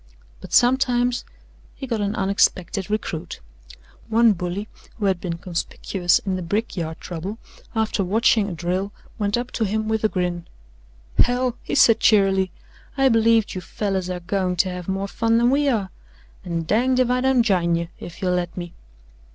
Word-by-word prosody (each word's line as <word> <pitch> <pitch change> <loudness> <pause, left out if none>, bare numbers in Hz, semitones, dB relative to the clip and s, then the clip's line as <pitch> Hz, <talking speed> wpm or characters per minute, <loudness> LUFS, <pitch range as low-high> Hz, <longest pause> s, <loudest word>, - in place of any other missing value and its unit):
But - - -11
sometimes 245 -1 +3 0.5
he 270 - -6
got 230 -4 -2
an 205 +1 -1
unexpected 190 -1 +1
recruit. 180 -6 -3 0.7
One 230 0 +5
bully, 180 +3 -4 0.3
who 210 - -2
had 190 -3 +1
been 170 -2 -3
conspicuous 175 +1 0
in 190 -2 -2
the - - -4
brickyard 170 -3 -3
trouble, 180 +5 -6 0.4
after 220 -2 0
watching 215 +2 +2
a - - -5
drill 180 +4 -2 0.3
went 205 +1 +1
up 245 +1 -4
to 225 - -1
him 215 +1 -1
with 220 0 -1
a 215 - +3
grin: 175 -3 -2 0.7
"Hell," 245 0 +2
he - - -4
said 230 - +6
cheerily, 195 -3 +4 0.5
"I 270 0 +4
believe 225 -2 +3
you 185 - -4
fellers 190 0 -3
air 180 -1 -4
goin' 185 0 -1
to 185 +2 +2
have 180 -1 -6
more 195 +1 -2
fun 230 +2 +1
than 240 +2 +3
we 285 +1 +2
air, 205 -8 -1 0.5
an' 170 -2 -3
danged 250 +8 +2
if 250 -1 +3
I 250 0 +1
don't 265 -2 +3
jine 175 -6 +2
you, 170 0 -3
if 175 +2 -9
you'll 180 -1 +2
let 175 0 -2
me." 175 -1 -6
200 Hz, 175 wpm, -22 LUFS, 180-230 Hz, 0.7 s, said